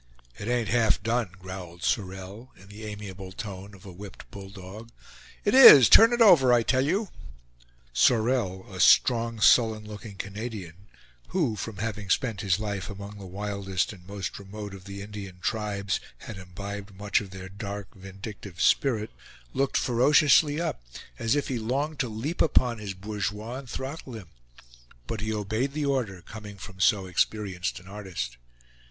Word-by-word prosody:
"It 100 Hz, -, -6 dB
ain't 120 Hz, -4 st, 0 dB
half 115 Hz, -1 st, +2 dB
done," 115 Hz, -2 st, 0 dB
growled 90 Hz, -2 st, -9 dB
Sorel, 95 Hz, +5 st, -3 dB
in 95 Hz, +1 st, -17 dB
the 105 Hz, +2 st, -9 dB
amiable 100 Hz, -3 st, -8 dB
tone 100 Hz, 0 st, -8 dB
of 95 Hz, -, -17 dB
a 95 Hz, -, -9 dB
whipped 100 Hz, +5 st, -11 dB
bull 100 Hz, -3 st, -9 dB
dog. 100 Hz, +3 st, -10 dB, 0.6 s
"It 205 Hz, -, +2 dB
is. 145 Hz, -, +11 dB
Turn 225 Hz, +1 st, +8 dB
it 240 Hz, 0 st, +1 dB
over, 165 Hz, -, +7 dB
I 120 Hz, -1 st, +5 dB
tell 130 Hz, +3 st, +2 dB
you!" 190 Hz, +8 st, 0 dB, 0.8 s
Sorel, 110 Hz, -, +2 dB
a 95 Hz, -, -7 dB
strong, 115 Hz, +2 st, +4 dB
sullen 110 Hz, -1 st, +4 dB
looking 105 Hz, -1 st, -9 dB
Canadian, 100 Hz, -3 st, -7 dB, 0.4 s
who 155 Hz, -12 st, 0 dB
from 105 Hz, +1 st, -6 dB
having 105 Hz, -1 st, -4 dB
spent 110 Hz, 0 st, 0 dB
his 95 Hz, -3 st, +2 dB
life 105 Hz, -2 st, -4 dB
among 100 Hz, 0 st, -8 dB
the 95 Hz, -, -9 dB
wildest 100 Hz, 0 st, -2 dB
and 90 Hz, -2 st, -16 dB
most 100 Hz, -1 st, -5 dB
remote 100 Hz, +1 st, -8 dB
of 95 Hz, -2 st, -11 dB
the 100 Hz, 0 st, -7 dB
Indian 100 Hz, -3 st, -8 dB
tribes, 100 Hz, -1 st, -2 dB, 0.2 s
had 110 Hz, -, -9 dB
imbibed 100 Hz, +2 st, -8 dB
much 100 Hz, +2 st, 0 dB
of 100 Hz, -, -9 dB
their 95 Hz, 0 st, -8 dB
dark, 100 Hz, +1 st, -7 dB
vindictive 95 Hz, -1 st, -10 dB
spirit, 115 Hz, -6 st, +2 dB, 0.4 s
looked 135 Hz, 0 st, +1 dB
ferociously 145 Hz, +4 st, +4 dB
up, 170 Hz, -, -2 dB, 0.4 s
as 115 Hz, +4 st, +1 dB
if 145 Hz, -, 0 dB
he 125 Hz, -3 st, -2 dB
longed 140 Hz, +7 st, -2 dB
to 125 Hz, -, 0 dB
leap 120 Hz, +10 st, -3 dB
upon 125 Hz, -6 st, +2 dB
his 100 Hz, -3 st, -5 dB
bourgeois 105 Hz, +4 st, -4 dB
and 135 Hz, -3 st, -12 dB
throttle 135 Hz, 0 st, -6 dB
him; 105 Hz, -7 st, -9 dB, 0.8 s
but 105 Hz, -, -4 dB
he 110 Hz, 0 st, -2 dB
obeyed 110 Hz, +6 st, -2 dB
the 150 Hz, 0 st, -1 dB
order, 115 Hz, -10 st, -1 dB
coming 105 Hz, +1 st, -10 dB
from 95 Hz, -1 st, -11 dB
so 95 Hz, 0 st, +3 dB
experienced 95 Hz, -1 st, -1 dB
an 90 Hz, -, -17 dB
artist. 90 Hz, -12 st, -6 dB
105 Hz, 165 wpm, -27 LUFS, 95-120 Hz, 0.8 s, is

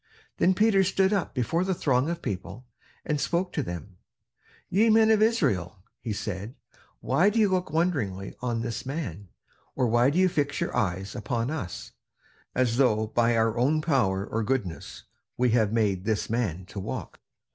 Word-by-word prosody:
Then 185 Hz, +1 st, +3 dB
Peter 210 Hz, -1 st, +4 dB
stood 190 Hz, +2 st, +2 dB
up 195 Hz, -7 st, -1 dB
before 140 Hz, +8 st, 0 dB
the 190 Hz, 0 st, 0 dB
throng 135 Hz, -1 st, +1 dB
of 170 Hz, 0 st, -4 dB
people, 100 Hz, +4 st, -5 dB, 0.4 s
and 150 Hz, -2 st, -1 dB
spoke 180 Hz, +2 st, -1 dB
to -, -, 0 dB
them: 90 Hz, +2 st, -7 dB, 0.7 s
"Ye 215 Hz, +5 st, +3 dB
men 220 Hz, 0 st, +5 dB
of 215 Hz, -1 st, +4 dB
Israel," 110 Hz, -, +1 dB, 0.2 s
he 115 Hz, -, -5 dB
said, 105 Hz, +2 st, -5 dB, 0.5 s
"why 195 Hz, +5 st, +3 dB
do 215 Hz, -, -3 dB
you 215 Hz, -2 st, +5 dB
look 185 Hz, -1 st, 0 dB
wondering 135 Hz, -, -1 dB
on 120 Hz, -2 st, -1 dB
this 115 Hz, 0 st, -4 dB
man? 130 Hz, -, -5 dB, 0.5 s
or 125 Hz, -, +1 dB
why 120 Hz, +2 st, +3 dB
do 150 Hz, -, -1 dB
you 185 Hz, 0 st, +5 dB
fix 145 Hz, -5 st, -1 dB
your -, -, -2 dB
eyes 95 Hz, +2 st, -1 dB
upon 115 Hz, +3 st, -2 dB
us, 120 Hz, -, -5 dB, 0.6 s
as 120 Hz, -2 st, +1 dB
though 110 Hz, -5 st, +3 dB
by 115 Hz, +1 st, +1 dB
our 110 Hz, 0 st, +2 dB
own 145 Hz, +6 st, +3 dB
power 120 Hz, -, +1 dB
or 115 Hz, -, -2 dB
goodness 110 Hz, -8 st, -3 dB, 0.3 s
we 125 Hz, -1 st, +2 dB
had 110 Hz, -3 st, +2 dB
made 105 Hz, -5 st, +1 dB
this 110 Hz, 0 st, -1 dB
man 100 Hz, -7 st, -1 dB
to 100 Hz, +1 st, -8 dB
walk? 95 Hz, -, -6 dB
120 Hz, 175 wpm, -27 LUFS, 105-170 Hz, 0.7 s, men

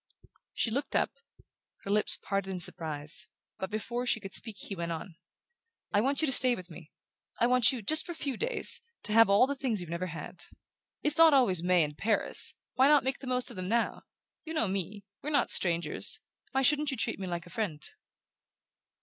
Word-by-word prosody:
She 230 Hz, -, 0 dB
looked 275 Hz, +4 st, -3 dB
up, -, -, +2 dB, 0.7 s
her 200 Hz, -, -4 dB
lips 210 Hz, 0 st, +3 dB
parted 195 Hz, -1 st, -3 dB
in 185 Hz, -1 st, -4 dB
surprise; 155 Hz, -4 st, +1 dB, 0.3 s
but 190 Hz, -, -4 dB
before 235 Hz, +4 st, -3 dB
she 225 Hz, -, +1 dB
could 195 Hz, -2 st, -9 dB
speak 220 Hz, -3 st, -2 dB
he 200 Hz, -, -6 dB
went 170 Hz, -1 st, -4 dB
on: 165 Hz, +1 st, -6 dB, 0.8 s
"I 205 Hz, -, +4 dB
want 275 Hz, +5 st, +1 dB
you -, -, +4 dB
to 275 Hz, -, +1 dB
stay 255 Hz, -1 st, +5 dB
with 180 Hz, -3 st, -11 dB
me 160 Hz, -1 st, -12 dB, 0.5 s
I -, -, +4 dB
want 250 Hz, -2 st, +4 dB
you, 250 Hz, -4 st, -6 dB
just 310 Hz, +9 st, +3 dB
for 345 Hz, -, -4 dB
a -, -, -12 dB
few 280 Hz, -4 st, -3 dB
days, 485 Hz, +1 st, -1 dB, 0.2 s
to 210 Hz, -, 0 dB
have 225 Hz, -1 st, +6 dB
all 200 Hz, +5 st, +5 dB
the 280 Hz, -, -2 dB
things 260 Hz, -6 st, -2 dB
you've 175 Hz, -2 st, -7 dB
never 170 Hz, +2 st, -3 dB
had. 165 Hz, -1 st, -8 dB, 0.6 s
It's 300 Hz, -, -1 dB
not 325 Hz, -3 st, +8 dB
always 195 Hz, -11 st, +3 dB
May 180 Hz, -1 st, +3 dB
and 150 Hz, -1 st, -4 dB
Paris 215 Hz, +6 st, +3 dB, 0.2 s
why 260 Hz, +2 st, +4 dB
not 295 Hz, -1 st, +5 dB
make 265 Hz, +1 st, -2 dB
the 265 Hz, -, -9 dB
most 250 Hz, -1 st, 0 dB
of 225 Hz, -, -11 dB
them 185 Hz, 0 st, -4 dB
now? 235 Hz, +1 st, 0 dB, 0.4 s
You 320 Hz, 0 st, -7 dB
know 310 Hz, -, +1 dB
me 195 Hz, +1 st, -3 dB, 0.2 s
we're 295 Hz, -, -4 dB
not 290 Hz, -2 st, +1 dB
strangers 170 Hz, -3 st, +1 dB, 0.3 s
why 270 Hz, 0 st, 0 dB
shouldn't 295 Hz, +2 st, +3 dB
you 265 Hz, -, -3 dB
treat 225 Hz, -, 0 dB
me 190 Hz, -, -5 dB
like 175 Hz, -1 st, -4 dB
a 175 Hz, -, -14 dB
friend?" 165 Hz, -7 st, -3 dB
215 Hz, 210 wpm, -30 LUFS, 180-265 Hz, 0.8 s, not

